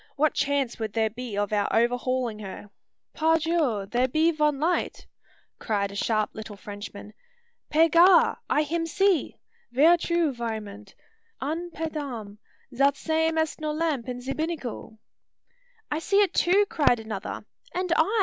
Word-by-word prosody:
What 300 Hz, +1 st, +2 dB
chance 280 Hz, -4 st, 0 dB
would 220 Hz, -2 st, -3 dB
there 220 Hz, -1 st, +1 dB
be 235 Hz, -2 st, -6 dB
of 205 Hz, +1 st, -1 dB
our 205 Hz, -1 st, +2 dB
overhaulin' 245 Hz, -1 st, 0 dB
her?" 205 Hz, 0 st, -9 dB, 0.4 s
"Par 320 Hz, +1 st, +3 dB
Dieu! 305 Hz, -11 st, 0 dB
there 245 Hz, +5 st, +1 dB
be 315 Hz, +6 st, +2 dB
von 300 Hz, -3 st, +1 dB
light!" 340 Hz, +4 st, -1 dB, 0.5 s
cried 200 Hz, -3 st, -1 dB
a -, -, -9 dB
sharp 215 Hz, +1 st, 0 dB
eyed -, -, -18 dB
little 215 Hz, -1 st, -7 dB
Frenchman. 205 Hz, +1 st, -9 dB, 0.6 s
"Pe 320 Hz, +2 st, +5 dB
Gar! 340 Hz, +3 st, +5 dB
I 300 Hz, -, +3 dB
him 330 Hz, +2 st, -2 dB
see. 380 Hz, +2 st, +1 dB, 0.3 s
Ver 310 Hz, +8 st, +5 dB
true, 340 Hz, -3 st, 0 dB
vraiment! 215 Hz, -4 st, -6 dB, 0.4 s
An 325 Hz, +6 st, -3 dB
pe 325 Hz, -1 st, -4 dB
dam! 240 Hz, -10 st, -6 dB, 0.4 s
zat 275 Hz, +2 st, +3 dB
same 320 Hz, +1 st, 0 dB
est 315 Hz, 0 st, -1 dB
no 305 Hz, 0 st, -1 dB
lamp 300 Hz, -6 st, -1 dB
in 250 Hz, 0 st, -5 dB
ze 265 Hz, +2 st, -3 dB
binnacle!" 305 Hz, -9 st, -5 dB, 0.9 s
"I 300 Hz, -, 0 dB
see 395 Hz, +5 st, +3 dB
it 390 Hz, -3 st, +2 dB
too!" 390 Hz, +4 st, +4 dB
cried 285 Hz, -, +2 dB
another. 220 Hz, -3 st, -6 dB, 0.3 s
"And 365 Hz, -1 st, 0 dB
I!" 400 Hz, +9 st, +2 dB
275 Hz, 160 wpm, -26 LUFS, 220-325 Hz, 0.9 s, Pe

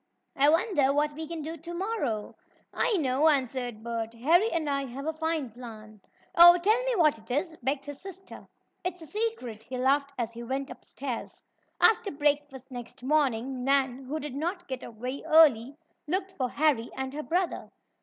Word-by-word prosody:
"I 280 Hz, +2 st, +5 dB
wonder 325 Hz, -4 st, +3 dB
what 295 Hz, +1 st, +1 dB
we 315 Hz, +1 st, -6 dB
can 330 Hz, -1 st, -5 dB
do 325 Hz, +2 st, -5 dB
to 335 Hz, +3 st, -8 dB
morrow?" 340 Hz, -, -2 dB, 0.4 s
"I 435 Hz, -, +2 dB
know," 285 Hz, 0 st, +3 dB
answered 250 Hz, -5 st, -1 dB
Bert. 230 Hz, -1 st, -4 dB
"Harry 335 Hz, -, +3 dB
and 325 Hz, -3 st, -1 dB
I 275 Hz, -1 st, 0 dB
have 265 Hz, +3 st, -7 dB
a 320 Hz, -, -1 dB
fine 315 Hz, -5 st, -2 dB
plan." 215 Hz, -3 st, -11 dB, 0.3 s
"Oh, 345 Hz, +1 st, +9 dB
tell 430 Hz, +7 st, +2 dB
me -, -, +1 dB
what 305 Hz, -, +3 dB
it 220 Hz, -, -20 dB
is," 310 Hz, +6 st, -1 dB
begged 270 Hz, +3 st, -1 dB
his 290 Hz, -1 st, -8 dB
sister. 385 Hz, 0 st, -11 dB, 0.4 s
"It's 360 Hz, -2 st, -4 dB
a -, -, -8 dB
secret," 410 Hz, -, -3 dB
he 255 Hz, +3 st, -7 dB
laughed 280 Hz, +2 st, +2 dB
as 235 Hz, -2 st, -2 dB
he 230 Hz, 0 st, -9 dB
went 265 Hz, +3 st, -3 dB
upstairs. 255 Hz, -4 st, -7 dB, 0.4 s
After 445 Hz, -1 st, +4 dB
breakfast 285 Hz, -2 st, -1 dB
next 245 Hz, 0 st, -9 dB
morning 260 Hz, -3 st, +1 dB
Nan, 270 Hz, -1 st, +1 dB
who 300 Hz, +4 st, -3 dB
did 295 Hz, -3 st, -6 dB
not 350 Hz, +6 st, -3 dB
get 260 Hz, -1 st, -5 dB
up 230 Hz, -, -9 dB
very 250 Hz, +5 st, -5 dB
early, 285 Hz, -4 st, +5 dB, 0.3 s
looked 375 Hz, +4 st, -1 dB
for 260 Hz, -9 st, -2 dB
Harry 280 Hz, -6 st, +1 dB
and 265 Hz, 0 st, -3 dB
her 300 Hz, -, -4 dB
brother. 350 Hz, +3 st, -1 dB
280 Hz, 185 wpm, -28 LUFS, 250-330 Hz, 0.4 s, Oh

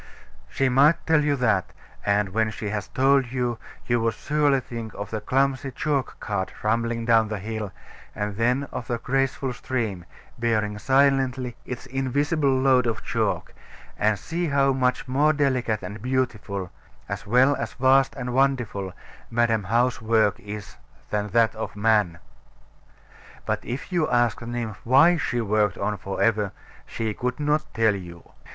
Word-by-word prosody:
She 135 Hz, -, +1 dB
might 140 Hz, +5 st, +4 dB
tell 160 Hz, -2 st, +3 dB
you 145 Hz, -1 st, +2 dB
that; 110 Hz, -8 st, +1 dB, 0.3 s
and 100 Hz, 0 st, +1 dB
when 110 Hz, +3 st, +1 dB
she 105 Hz, -1 st, -5 dB
had 105 Hz, 0 st, -3 dB
told 135 Hz, -1 st, +3 dB
you, 125 Hz, -3 st, -1 dB, 0.3 s
you 120 Hz, -1 st, +1 dB
would 115 Hz, -1 st, 0 dB
surely 145 Hz, -1 st, +2 dB
think 115 Hz, -4 st, -7 dB
of 100 Hz, -1 st, -6 dB
the 110 Hz, -1 st, -3 dB
clumsy 135 Hz, +2 st, +1 dB
chalk 140 Hz, -1 st, -2 dB
cart 100 Hz, -3 st, -3 dB
rumbling 115 Hz, +1 st, 0 dB
down 115 Hz, -2 st, +4 dB
the 105 Hz, 0 st, -3 dB
hill, 105 Hz, 0 st, -5 dB, 0.4 s
and 105 Hz, -1 st, -3 dB
then 125 Hz, +5 st, +1 dB
of 120 Hz, -, -5 dB
the 120 Hz, -, -1 dB
graceful 135 Hz, +1 st, -1 dB
stream, 110 Hz, -8 st, -3 dB, 0.3 s
bearing 110 Hz, -3 st, 0 dB
silently 130 Hz, -1 st, +2 dB
its 125 Hz, -, -6 dB
invisible 140 Hz, +3 st, 0 dB
load 130 Hz, -2 st, +3 dB
of 110 Hz, -2 st, -2 dB
chalk; -, -, -1 dB, 0.4 s
and 105 Hz, -1 st, +2 dB
see 170 Hz, -, -3 dB
how 140 Hz, -2 st, +3 dB
much 125 Hz, -1 st, 0 dB
more 145 Hz, +4 st, +3 dB
delicate 130 Hz, -6 st, 0 dB
and 105 Hz, 0 st, -7 dB
beautiful, 110 Hz, -7 st, -2 dB, 0.4 s
as 100 Hz, +3 st, -5 dB
well 130 Hz, +5 st, +4 dB
as -, -, -4 dB
vast 135 Hz, +1 st, +3 dB
and 125 Hz, -1 st, -4 dB
wonderful, 120 Hz, -8 st, 0 dB, 0.4 s
Madam 115 Hz, -3 st, +1 dB
How's 120 Hz, +4 st, +1 dB
work 110 Hz, -2 st, +2 dB
is 105 Hz, 0 st, -8 dB, 0.3 s
than 105 Hz, 0 st, 0 dB
that 115 Hz, +2 st, +3 dB
of 110 Hz, -1 st, -6 dB
man. 105 Hz, -5 st, +2 dB, 1.3 s
But -, -, -1 dB
if 130 Hz, +9 st, -6 dB
you 175 Hz, -4 st, +1 dB
asked 120 Hz, -4 st, +2 dB
the 115 Hz, -, -8 dB
nymph 120 Hz, -3 st, -4 dB
why 160 Hz, +8 st, +5 dB
she 125 Hz, -4 st, -1 dB
worked 105 Hz, -2 st, +1 dB
on 105 Hz, -, -1 dB
for 95 Hz, 0 st, -5 dB
ever, 105 Hz, -3 st, +1 dB, 0.3 s
she 110 Hz, -2 st, -3 dB
could 125 Hz, +4 st, -3 dB
not 150 Hz, +1 st, 0 dB
tell 110 Hz, -1 st, +3 dB
you. 85 Hz, -4 st, -9 dB
120 Hz, 160 wpm, -24 LUFS, 105-135 Hz, 1.3 s, why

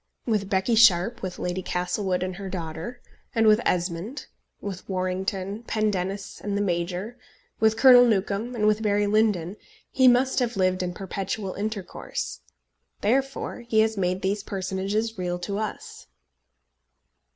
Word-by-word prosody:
With 210 Hz, -4 st, 0 dB
Becky 190 Hz, +3 st, +1 dB
Sharpe, 225 Hz, 0 st, +5 dB
with 185 Hz, -1 st, -5 dB
Lady 180 Hz, +1 st, -2 dB
Castlewood 180 Hz, +1 st, -1 dB
and 185 Hz, -1 st, -4 dB
her 195 Hz, -1 st, -6 dB
daughter, 175 Hz, +6 st, -6 dB, 0.3 s
and 225 Hz, -1 st, +3 dB
with 215 Hz, +1 st, +6 dB
Esmond, 180 Hz, -, -2 dB, 0.3 s
with 195 Hz, -2 st, -7 dB
Warrington, 190 Hz, +2 st, -2 dB
Pendennis, 200 Hz, -2 st, -2 dB
and 205 Hz, -1 st, -1 dB
the -, -, 0 dB
Major, 180 Hz, +6 st, -2 dB, 0.4 s
with 220 Hz, 0 st, +3 dB
Colonel 250 Hz, -2 st, +8 dB
Newcombe, 215 Hz, +1 st, 0 dB
and 215 Hz, -2 st, 0 dB
with 215 Hz, 0 st, +3 dB
Barry 205 Hz, -1 st, +2 dB
Lyndon, 205 Hz, -3 st, +1 dB, 0.3 s
he 260 Hz, -1 st, +4 dB
must 255 Hz, +2 st, +4 dB
have 240 Hz, -3 st, -1 dB
lived 185 Hz, -1 st, +2 dB
in 180 Hz, -1 st, -3 dB
perpetual 195 Hz, +1 st, -4 dB
intercourse. 205 Hz, -2 st, -4 dB, 0.6 s
Therefore 265 Hz, +6 st, 0 dB
he 235 Hz, -2 st, +2 dB
has 220 Hz, 0 st, +1 dB
made 185 Hz, -1 st, -1 dB
these 200 Hz, +2 st, 0 dB
personages 195 Hz, +2 st, -2 dB
real 175 Hz, -1 st, -1 dB
to 200 Hz, +3 st, -4 dB
us. 215 Hz, -1 st, -6 dB
200 Hz, 140 wpm, -25 LUFS, 185-220 Hz, 0.6 s, Colonel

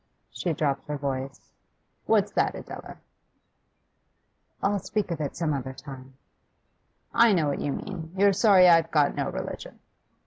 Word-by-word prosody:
She 175 Hz, -, -3 dB
dropped 140 Hz, -2 st, -1 dB
her 150 Hz, 0 st, -3 dB
voice. 135 Hz, -1 st, -5 dB, 0.5 s
'What's 210 Hz, -2 st, +3 dB
that, -, -, 0 dB
Adela?' -, -, -9 dB, 1.7 s
'I'll 200 Hz, 0 st, +1 dB
speak 205 Hz, 0 st, -3 dB
of 160 Hz, -2 st, -3 dB
it 145 Hz, -, -4 dB
some 165 Hz, -3 st, -1 dB
other 130 Hz, -1 st, -4 dB
time.' 135 Hz, -2 st, -11 dB, 1.0 s
'I 230 Hz, -2 st, +5 dB
know 165 Hz, -5 st, +2 dB
what 145 Hz, -, -2 dB
you 145 Hz, -, -1 dB
mean. 165 Hz, +1 st, -6 dB
You're 200 Hz, +1 st, +5 dB
sorry 190 Hz, -3 st, +6 dB
I've 165 Hz, -1 st, +5 dB
got 150 Hz, -3 st, +2 dB
no -, -, -2 dB
religion. -, -, -6 dB
160 Hz, 145 wpm, -26 LUFS, 140-190 Hz, 1.7 s, sorry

